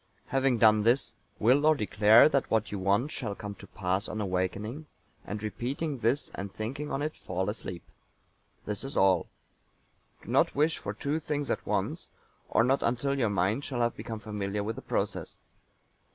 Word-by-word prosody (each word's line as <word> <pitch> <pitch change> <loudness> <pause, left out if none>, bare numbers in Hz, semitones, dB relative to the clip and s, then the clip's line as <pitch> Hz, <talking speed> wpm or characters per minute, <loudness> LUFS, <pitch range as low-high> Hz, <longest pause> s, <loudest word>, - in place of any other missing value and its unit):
Having 135 -2 +2
done 110 -1 +5
this, 120 +5 +2 0.2
will 130 +6 +4
or 155 0 +5
declare 105 -1 +6
that 140 -3 0
what 110 -2 +1
you 100 - -3
want 100 +10 +1
shall 100 - -4
come 105 -1 -6
to 100 0 -13
pass 95 +2 -2
on 110 - -4
awaking, 105 - -2 0.4
and 105 +1 -5
repeating 135 +6 -3
this 120 +6 0
and 100 0 -5
thinking 135 +9 -5
on 140 0 -2
it, 155 +1 -3
fall 95 +2 -2
asleep. 90 -5 -6 0.8
This 105 -1 -3
is 135 +2 -4
all. 95 -2 +4 1.0
Do - - -12
not - - +3
wish 150 +3 +2
for 100 - -5
two 145 +7 -1
things 145 -2 -2
at - - -3
once, - - -2 0.4
or - - +4
not 130 +3 +2
until 125 +4 0
your 115 -4 +2
mind 100 +7 +1
shall 125 -4 -2
have 120 0 +1
become 115 -2 -6
familiar 105 -1 -3
with 110 +2 -3
the - - -7
process. - - -3
110 Hz, 180 wpm, -29 LUFS, 100-135 Hz, 1.0 s, declare